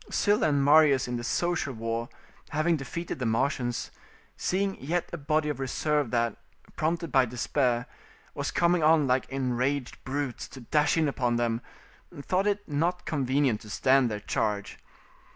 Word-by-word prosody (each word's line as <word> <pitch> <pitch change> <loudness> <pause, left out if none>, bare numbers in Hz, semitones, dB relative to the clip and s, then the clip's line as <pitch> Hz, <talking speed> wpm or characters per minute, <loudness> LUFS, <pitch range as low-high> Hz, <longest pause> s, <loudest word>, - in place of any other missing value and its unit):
Sylla 205 -6 +2
and 140 -1 +2
Marius 145 -3 +5
in 120 0 -2
the 120 - -5
social 175 +2 -1
war, 115 +1 -3 0.4
having 160 +2 +1
defeated 155 +3 -5
the 125 - -1
Marsians, 120 +1 -1 0.4
seeing 195 +1 -1
yet 165 +6 -1
a - - -2
body 150 +1 0
of 145 -3 -3
reserve 145 +1 0
that, 115 -2 0 0.4
prompted 165 0 -1
by 130 -1 +5
despair, 125 0 0 0.5
was - - -3
coming 170 0 +2
on 155 -1 +5
like 130 0 +1
enraged 130 0 -2
brutes 135 -1 -3
to 130 - -11
dash 150 +7 +2
in 160 -2 +3
upon 125 -4 0
them, 120 -1 0 0.6
thought 185 +7 0
it 205 0 -1
not 170 +5 -1
convenient 135 -5 +1
to 105 - -12
stand 130 +3 +3
their 105 -1 -3
charge. 105 -1 -2
135 Hz, 155 wpm, -28 LUFS, 120-155 Hz, 0.6 s, Marius